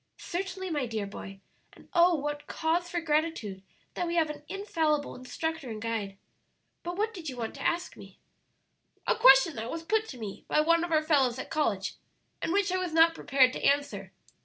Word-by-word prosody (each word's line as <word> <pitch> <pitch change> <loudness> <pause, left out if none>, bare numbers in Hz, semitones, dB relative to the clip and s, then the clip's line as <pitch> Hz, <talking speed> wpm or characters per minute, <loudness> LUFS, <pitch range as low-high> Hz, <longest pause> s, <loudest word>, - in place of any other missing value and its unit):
"Certainly, 375 +1 -4
my 290 -5 -1
dear 220 -3 -3
boy; 195 -1 -9 0.3
and, - - -18
oh 345 0 +5
what 290 0 -4
cause 340 +2 0
for 345 - -1
gratitude 300 -11 -1 0.3
that 355 - -2
we 340 - -2
have 320 -3 +2
an 295 -1 -10
infallible 320 -7 -1
instructor 320 +3 -4
and 220 -1 -5
guide! 215 -3 -3 0.6
But 350 +1 -5
what 440 +2 0
did 340 -7 -6
you 255 - -7
want 230 -2 -4
to - - -10
ask 345 +1 -1
me?" - - -13 0.9
"A - - +2
question 270 +4 +7
that 225 +2 -4
was 330 +3 -5
put 435 +5 +1
to 260 - -8
me 210 -4 -7
by 305 - +3
one 335 +2 +3
of 345 - -3
our 310 -1 +3
fellows 270 -6 +3
at 260 - -7
college, 225 -12 -1 0.4
and - - -1
which 395 0 +2
I 370 - +1
was 365 -3 -3
not 330 +1 +6
prepared 260 -5 +3
to - - -6
answer. 285 0 +1
310 Hz, 200 wpm, -29 LUFS, 255-345 Hz, 0.9 s, question